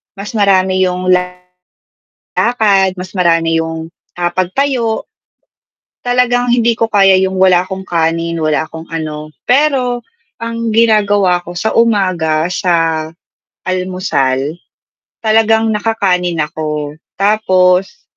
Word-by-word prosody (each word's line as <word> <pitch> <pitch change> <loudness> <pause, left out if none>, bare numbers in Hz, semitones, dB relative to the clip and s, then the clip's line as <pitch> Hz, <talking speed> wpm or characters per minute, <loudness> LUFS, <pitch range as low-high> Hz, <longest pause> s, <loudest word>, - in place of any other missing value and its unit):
mas 200 +1 -7
marami 190 -3 +2
yung 180 0 -1 1.0
lakad, 200 -5 +1
mas 185 0 -8
marami 165 -3 +1
yung, 160 0 -5 0.2
ah, 175 0 -1
pagtayo, 225 +5 -1 1.0
talagang 245 0 +1
hindi 235 -1 +2
ko 225 -1 -1
kaya 195 -2 +5
yung 190 0 0
wala 185 -1 +4
akong 190 0 -7
kanin, 165 0 0
wala 155 -1 0
akong 160 0 -9
ano, 155 -1 -5 0.2
pero 250 -3 +1 0.3
ang 230 0 -4
ginagawa 205 -5 +3
ko 175 0 -10
sa 220 +5 -1
umaga, 185 -9 +1
sa 165 -4 0 0.6
almusal, 180 -7 -1 0.6
talagang 220 0 +2
naka-kanin 185 -6 0
ako 150 -1 -3 0.2
tapos 195 - +2
185 Hz, 105 wpm, -14 LUFS, 165-220 Hz, 1.0 s, kaya